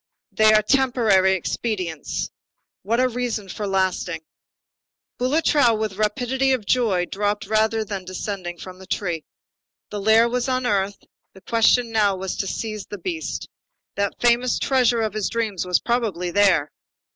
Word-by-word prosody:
They 215 0 +5
are 215 0 +5
temporary 225 -7 +3
expedients. 185 -4 -3 0.5
What 230 +5 0
a 255 - +4
reason 240 -5 -3
for 205 +2 -4
lasting! 185 -3 -1 1.0
Boulatruelle, 255 -3 +3
with 215 -1 -2
the 190 - -13
rapidity 250 +5 +1
of 240 -5 -2
joy, 205 -7 +2
dropped 205 +3 -2
rather 220 +1 +1
than 195 -2 -5
descended 185 -2 -5
from 185 0 -10
the 190 - -13
tree. 170 -6 -2 0.7
The 205 -1 -4
lair 220 +3 +5
was 245 +1 -1
unearthed, 205 -6 -1 0.3
the 190 - -14
question 230 +3 +3
now 210 -3 +2
was 190 0 -4
to 195 - -2
seize 215 0 -4
the 205 - -7
beast. 330 - -4 0.5
That 200 -1 -2
famous 240 +1 +2
treasure 250 -3 +2
of 215 -2 -2
his 215 -2 -1
dreams 215 -6 -2
was 180 - +3
probably 210 -8 -1
there. 185 -7 +3
215 Hz, 150 wpm, -22 LUFS, 190-235 Hz, 1.0 s, They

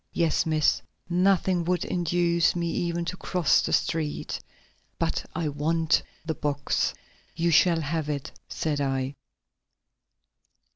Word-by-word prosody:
"Yes, 165 -1 +1
Miss; 155 -2 +2 0.3
nothing 180 0 +2
would 180 0 0
induce 170 -1 +2
me 170 -1 -1
even 170 0 -1
to 180 - -4
cross 180 -4 +2
the - - -2
street. 155 -2 -1 0.6
But - - -1
I 165 -1 -1
want 160 +3 +1 0.2
the 160 - -1
box." 145 -2 -1 0.4
"You 170 +1 +1
shall 165 +1 +5
have 155 0 -2
it," 145 -2 -3 0.2
said 150 -2 -1
I. 135 -1 -1
165 Hz, 125 wpm, -26 LUFS, 150-175 Hz, 0.6 s, shall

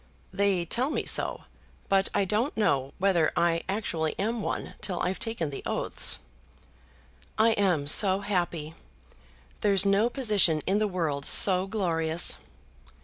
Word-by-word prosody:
"They 195 -3 0
tell 245 - -1
me - - -3
so, - - +1 0.4
but 195 -1 +1
I 200 - 0
don't 220 +9 -2
know 140 -10 0
whether 180 -4 +1
I 170 -1 +1
actually 170 -6 -3
am 225 +3 -2
one - - -5
till 185 -4 -4
I've 185 - -2
taken 225 - -4
the 135 - -7
oaths." - - 0 1.2
"I 220 +1 +4
am 185 -9 0
so 190 +6 +5
happy. 175 -6 -3 0.9
There's 200 -2 +2
no 200 +4 +2
position 210 - +2
in 195 +3 0
the 215 - 0
world 160 -7 -3
so 185 -1 +5
glorious!" 165 - +1
190 Hz, 140 wpm, -26 LUFS, 165-210 Hz, 1.2 s, so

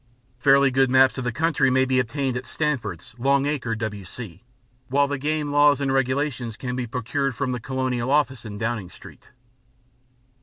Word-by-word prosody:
Fairly 140 -1 +5
good 135 0 +3
maps 130 +1 +4
of - - -3
the 120 - -1
country 155 0 +1
may 130 +1 +3
be 130 0 +2
obtained 130 +2 -1
at 125 - -5
Stanford's, 125 - -3
Long 140 +2 +2
Acre, 140 -6 -1
W.C., 105 -2 -7 0.5
while 140 +3 +2
the 145 -1 -3
Game 150 +1 -1
Laws 145 0 +5
and 135 -1 0
Regulations 130 -3 -1
can 125 0 -4
be 125 -1 -3
procured 130 +3 -2
from 135 0 -2
the 125 - -3
Colonial 130 0 -2
Office 135 -4 +1
in 105 -2 -7
Downing 110 -4 -3
Street. - - -15
130 Hz, 175 wpm, -24 LUFS, 120-140 Hz, 0.5 s, Fairly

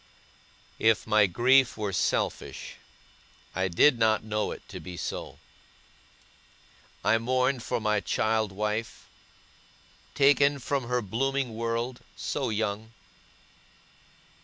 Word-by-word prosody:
If 110 -2 +3
my 110 -2 +4
grief 125 +8 +3
were 105 -3 -3
selfish, - - -2 0.8
I 95 0 0
did 115 +9 +4
not 110 -1 +3
know 105 -1 -1
it - - -9
to - - -7
be 90 -1 -9
so. - - -5 1.7
I 115 +2 +3
mourned 130 +2 +1
for - - -2
my 105 -1 +1
child 110 0 0
wife, 105 +3 -3 1.1
taken 140 0 +4
from 135 0 -2
her 125 0 -1
blooming 130 +4 -1
world, 115 +2 -2 0.2
so - - -2
young. 110 0 -2
110 Hz, 110 wpm, -27 LUFS, 105-125 Hz, 1.7 s, my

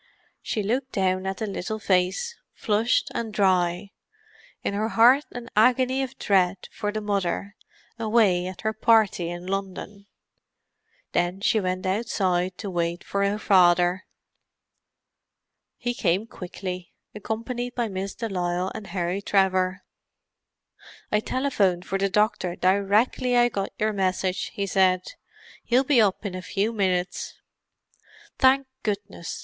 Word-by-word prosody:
She 215 - -2
looked 255 +6 -2
down 185 0 0
at 190 - -3
the 220 - -2
little 205 +1 -4
face, 190 - 0 0.2
flushed 220 +2 +1
and 225 -2 -3
dry; 185 -1 +1 0.7
in - - -1
her 215 +2 -1
heart 245 +6 +5
an 245 -1 -7
agony 255 +4 +3
of 265 -2 -5
dread 190 -2 +1
for 210 -2 -3
the 215 +1 -3
Mother, 200 0 -2 0.4
away 215 -6 +2
at 185 - -8
her 220 0 -1
party 215 -6 +3
in 175 +1 -6
London. 195 +1 -5 1.0
Then 175 +2 0
she 215 +2 +2
went 185 -1 -2
outside 185 -3 0
to 200 - -5
wait 170 0 -2
for 200 0 -1
her 200 +1 +1
father. 180 -2 +3 1.7
He 245 0 -2
came 190 -1 0
quickly, 180 -3 -7 0.2
accompanied 235 +4 -4
by 240 -2 0
Miss 195 -1 -5
de 230 - -3
Lisle 180 -1 -1
and 205 - -7
Harry 180 +1 -2
Trevor. 190 -1 +1 1.3
"I 210 - +3
telephoned 205 -8 0
for 195 0 -2
the 195 0 +1
doctor 210 -3 +1
directly 205 +7 +2
I 240 0 +5
got 195 -3 -3
your 215 0 0
message," 185 -1 -1
he 200 - -1
said. 185 -1 +2 0.5
"He'll 250 +2 +3
be 265 -3 +4
up 205 0 +1
in 195 - -3
a 185 - -5
few 205 +4 -1
minutes." 185 -3 -1 1.0
"Thank 270 +1 +5 0.2
goodness!" 200 -4 -4
200 Hz, 135 wpm, -25 LUFS, 185-220 Hz, 1.7 s, heart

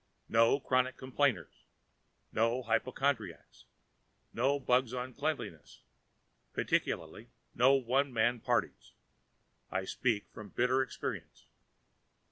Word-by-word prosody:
No 115 +4 +4
chronic 130 -1 +1
complainers, 130 - -1 0.7
no 115 +3 +1
hypochondriacs, 120 -4 -1 0.7
no 135 +4 +1
bugs 125 -1 +2
on 125 +1 -4
cleanliness 140 - -4 0.7
particularly - - -1 0.2
no 130 +3 +5
one 135 +2 +1
man 120 +1 +2
parties. - - -1 0.8
I 95 +1 -2
speak 110 -1 -1
from 105 -1 -10
bitter 125 +5 +2
experience. 130 - -5
125 Hz, 95 wpm, -32 LUFS, 115-130 Hz, 0.8 s, no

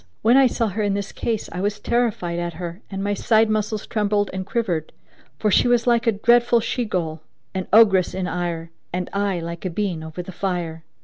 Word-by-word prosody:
When 230 +3 +5
I 270 -1 +7
saw 230 -2 0
her 210 +3 -3
in 205 -1 +1
this 200 0 -3
case 225 -3 -2
I 180 - -4
was 205 +1 -1
terrified 205 -7 0
at 175 0 -3
her 175 +2 -6
and 195 -1 -4
my 205 0 0
side 220 +1 +3
muscles 215 0 -1
trembled 205 -2 0
and 190 0 -4
quivered, 190 -8 -2 0.4
for 210 - +1
she - - +4
was 240 -1 +3
like 235 -1 +2
a - - +6
dreadful 235 +3 +4
she 235 +1 -2
Ghul, 165 -5 -2 0.3
an 190 -2 -3
ogress 195 -5 +5
in 190 -1 -2
ire, 170 -1 -3 0.2
and 180 0 -3
I 200 -2 0
like 170 0 -6
a 185 - -1
bean 180 -2 -2
over 160 +3 -6
the 190 - -8
fire. 175 -4 -3
200 Hz, 210 wpm, -22 LUFS, 175-220 Hz, 0.4 s, I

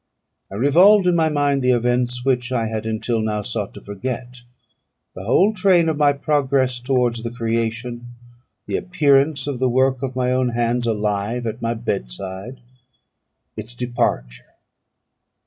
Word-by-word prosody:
I - - -7
revolved 180 - +5
in 180 -1 +3
my 160 -1 +2
mind 145 -2 +1
the 125 - +1
events 125 +1 0
which 125 -1 0
I 120 -3 0
had 110 0 -4
until 110 +1 -1
now 105 -1 -2
sought - - -4
to - - -10
forget: 125 +4 -6 0.7
the 95 - -9
whole 190 - +3
train 185 -4 +3
of 155 - -1
my 145 -1 +4
progress 140 -3 0
towards 125 -2 0
the 115 - -4
creation; 115 +1 -3 0.6
the - - -2
appearance 145 -6 +2
of 140 -4 -4
the 130 0 +2
work 130 +1 +1
of 130 -2 -4
my 125 -1 0
own 130 -1 +1
hands 120 0 0
alive 105 +2 -1
at 110 0 -4
my 115 0 -1
bedside; 100 - -5 0.9
its 110 +2 -8
departure. 60 - -3
125 Hz, 150 wpm, -21 LUFS, 115-135 Hz, 0.9 s, revolved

